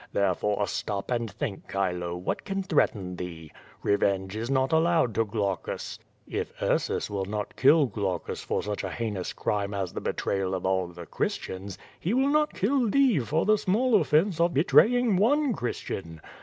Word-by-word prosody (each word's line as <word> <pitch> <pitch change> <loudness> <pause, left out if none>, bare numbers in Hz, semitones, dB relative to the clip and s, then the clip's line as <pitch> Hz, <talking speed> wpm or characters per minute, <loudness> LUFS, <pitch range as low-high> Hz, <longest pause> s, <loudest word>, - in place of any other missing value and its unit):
There 100 -2 +2
fore, 105 +2 0
stop 100 +3 -3
and 120 -2 0
think, 110 -4 -5
Chilo, 90 -3 -1
what 90 - -3
can 195 0 -2
threaten 100 - 0
thee? 85 -3 -7 0.3
Re 100 - +3
venge 95 0 0
is 115 +2 -3
not 130 -1 +1
allowed 160 -6 +3
to 115 - +1
Glaucus, 100 -3 -3 0.3
If - - -3
Ursus - - 0
will 100 -2 -3
not 105 +1 -4
kill 145 +3 +5
Glau 100 -5 -1
cus - - -7
for - - -2
such 105 0 -3
a 95 - -2
heinous 100 -1 -3
crime 100 -1 -2
as 95 -3 -3
the - - -4
betrayal 95 -1 -1
of 95 - -4
all 95 -1 +1
tixe 85 -1 -11
Chris - - 0
tians, 95 0 -7 0.2
he 190 +8 0
will 265 +2 +3
not 300 +1 +2
kill 240 +3 +1
thee 265 - +4
for 150 +6 0
the 215 0 +4
small 215 +2 +3
offence 160 +4 +2
of 170 0 +2
betraying 225 - +4
one 275 +6 +3
Christian. 95 - -4
110 Hz, 185 wpm, -27 LUFS, -, 0.3 s, kill